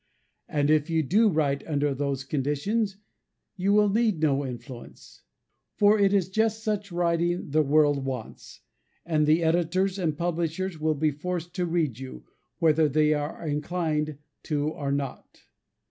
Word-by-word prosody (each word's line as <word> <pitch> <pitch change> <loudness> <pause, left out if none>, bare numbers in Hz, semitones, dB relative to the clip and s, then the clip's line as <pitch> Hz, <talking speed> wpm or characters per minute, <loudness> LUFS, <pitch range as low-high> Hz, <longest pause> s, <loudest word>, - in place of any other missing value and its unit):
And 145 0 +1
if 155 +1 +2
you 160 -1 +1
do 210 - +3
write 145 -5 0
under 145 -2 0
those 140 -1 -2
conditions, 155 - -1 0.6
you 190 +1 0
will 210 0 +5
need 215 -3 +1
no 145 -3 +2
influence: 125 -1 -10 0.5
for 210 +1 +4
it 200 -1 +4
is 195 -3 +2
just 220 +3 0
such 210 -2 -2
writing 170 -1 0
the 155 +2 +4
world 145 -1 +3
wants; 130 -4 -7 0.4
and 155 -3 +1
the 160 +2 +4
editors 175 +4 +1
and 160 -5 -1
publishers 170 +1 -2
will 155 0 +1
be 155 +1 +1
forced 175 +3 -5
to 180 -1 -1
read 160 -8 -1
you, 130 - -9 0.3
whether 160 -1 +3
they 155 +2 +3
are 150 +3 -4
inclined 150 -1 -2 0.3
to 150 -1 0
or 140 -3 -4
not. 140 -2 -5
155 Hz, 150 wpm, -26 LUFS, 145-180 Hz, 0.6 s, will